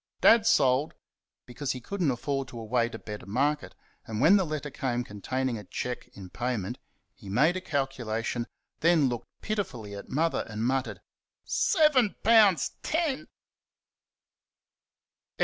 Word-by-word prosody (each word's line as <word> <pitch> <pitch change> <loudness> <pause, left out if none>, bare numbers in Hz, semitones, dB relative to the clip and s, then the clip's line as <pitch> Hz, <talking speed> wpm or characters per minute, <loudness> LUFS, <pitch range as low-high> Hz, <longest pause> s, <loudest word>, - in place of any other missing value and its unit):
Dad 225 -1 +6
sold 130 +3 +3 0.5
because 130 +3 -3
he 130 - -6
could 200 +11 -6
n't 160 - +3
afford 135 +2 -2
to 120 -3 -9
await 115 +1 0
a - - -4
better 105 -2 -8
market; 145 +8 0 0.3
and 110 -2 -4
when 160 - +6
the 190 -4 +2
letter 150 -1 -4
came 125 -3 -2
containing 120 +3 -3
a - - -9
cheque 125 +6 -5
in 95 -2 -11
payment, 120 0 -3 0.3
he 105 -7 -12
made 150 - +3
a 185 - -3
calculation, 125 -6 -2 0.3
then 160 -4 +4
looked 120 -2 -5 0.2
pitifully 145 - -3
at 100 - -8
Mother, 165 +4 +1
and 110 +1 -3
muttered 130 +1 -1 0.4
"SEVEN 300 - +3
POUN'S 215 -5 +5
TEN!" 310 -2 -1
130 Hz, 140 wpm, -28 LUFS, 115-170 Hz, 0.5 s, Dad